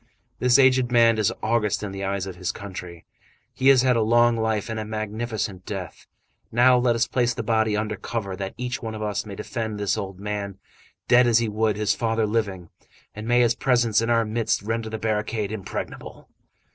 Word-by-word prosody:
This 125 0 +4
aged 130 -2 +4
man 115 -2 +4
is 105 - +2
august 105 -2 0
in 100 - -4
the 95 0 -6
eyes 100 0 -2
of 95 -2 -7
his 90 +1 -3
country. 90 -4 -9 0.5
He 130 - 0
has 135 -2 +7
had 130 -1 +3
a 115 - +2
long 120 +2 +4
life 110 -1 -1
and 110 -1 -4
a - - -3
magnificent 110 -2 -4
death! 95 -5 -7 0.4
Now, 125 +2 +5
let 120 -1 +2
us 115 +1 +2
place 120 -1 0
the - - -3
body 110 -2 +1
under 105 0 -2
cover, 100 -1 -4
that 95 0 -5
each 125 0 -4
one 110 -1 -5
of 110 - -5
us 105 0 -2
may 100 - -7
defend 110 -1 -4
this 100 +1 0
old 95 -2 -6
man 100 -1 -4 0.5
dead 125 0 +5
as 115 -2 +4
he 115 -1 +1
would 110 0 0
his 105 -1 +1
father 115 -1 0
living, 100 -6 -2 0.4
and 105 +1 -7
may 120 +1 +4
his 120 -1 +3
presence 120 -4 +2
in 115 - -1
our 115 -1 +3
midst 110 -1 -1
render 115 +1 -2
the 110 - -4
barricade 105 -1 -2
impregnable!" 110 -3 -7
110 Hz, 205 wpm, -24 LUFS, 105-120 Hz, 0.5 s, has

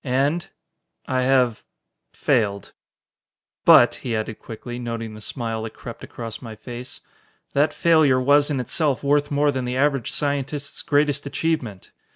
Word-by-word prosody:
And... 140 +6 0 0.6
I 130 -1 0
have 125 -3 +2 0.5
failed! 100 -4 0 0.9
"But," - - +8
he 120 -3 -2
added 110 0 -3
quickly, 120 +2 -8
noting 115 -2 -4
the 110 - -10
smile 115 -1 -4
that 110 0 -7
crept 115 -1 -9
across 115 -2 -7
my 115 -3 -8
face, 120 +2 -8 0.5
"that 145 +2 +3
failure 155 -6 +4
was 145 +3 +4
in 140 -3 -1
itself 140 +2 0
worth 145 +1 +2
more 145 0 +2
than 130 -2 -3
the 125 +1 -2
average 140 -3 +1
scientist's 140 0 -2
greatest 145 -1 +1
achievement! 140 - -2
130 Hz, 145 wpm, -23 LUFS, 115-145 Hz, 0.9 s, But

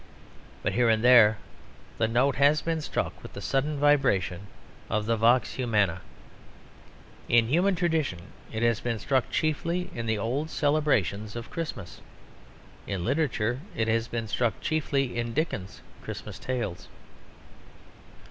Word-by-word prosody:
But - - 0
here 120 -1 +3
and 110 0 +2
there 115 -4 +7 0.6
the 110 - +3
note 125 +4 +2
has 145 +2 +4
been 165 -1 -1
struck - - -3
with - - -11
the - - -7
sudden 145 +2 -1
vibration 130 -11 +2 0.4
of 105 0 0
the 115 +1 +1
vox 120 +3 +3
humana. 105 -8 0 1.3
In 120 -1 +5
human 180 +7 +3
tradition 160 - 0 0.3
it 110 +1 -3
has 115 -3 +2
been 120 -2 -2
struck 130 +4 0
chiefly 170 +3 -1
in 115 -1 -4
the 110 -1 +1
old 130 +9 -2
celebrations 120 - 0
of 120 -1 -7
Christmas. 145 - -6 0.9
In 95 -4 -3
literature 125 -4 0 0.2
it 110 - 0
has 115 +1 +1
been 115 -2 -4
struck 115 -1 0
chiefly 140 -4 -1
in 120 -1 -3
Dickens's 120 - -3 0.2
Christmas - - -7
tales. 120 -9 -4
120 Hz, 140 wpm, -27 LUFS, 110-145 Hz, 1.3 s, there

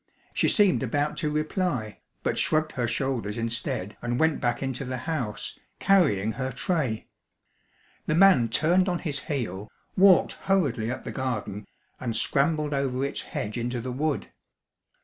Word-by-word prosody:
She - - +2
seemed 205 -4 +4
about 145 +4 0
to 155 - 0
reply, 155 - -2 0.2
but - - 0
shrugged 155 0 +2
her 120 -2 -1
shoulders 120 -3 -2
instead 115 -4 -2
and 120 0 -1
went 160 -1 +2
back 120 +2 0
into 135 0 -3
the 130 -1 -4
house, 130 -11 -3 0.2
carrying 135 - +3
her 130 +4 -3
tray. 130 -3 -1 1.0
The 155 - +2
man 165 -11 +6
turned 175 - +3
on 175 - 0
his 150 -5 -3
heel, 110 - -4 0.3
walked 190 -2 +6 0.2
hurriedly 135 - +2
up 130 - -4
the - - -5
garden, 105 -6 -3 0.3
and 120 -3 -3
scrambled 150 +5 +1
over 135 -1 0
its 140 - -3
hedge 105 +3 -4
into 120 +1 -2
the 125 +2 -4
wood. 145 +3 -2
130 Hz, 150 wpm, -26 LUFS, 115-155 Hz, 1.0 s, man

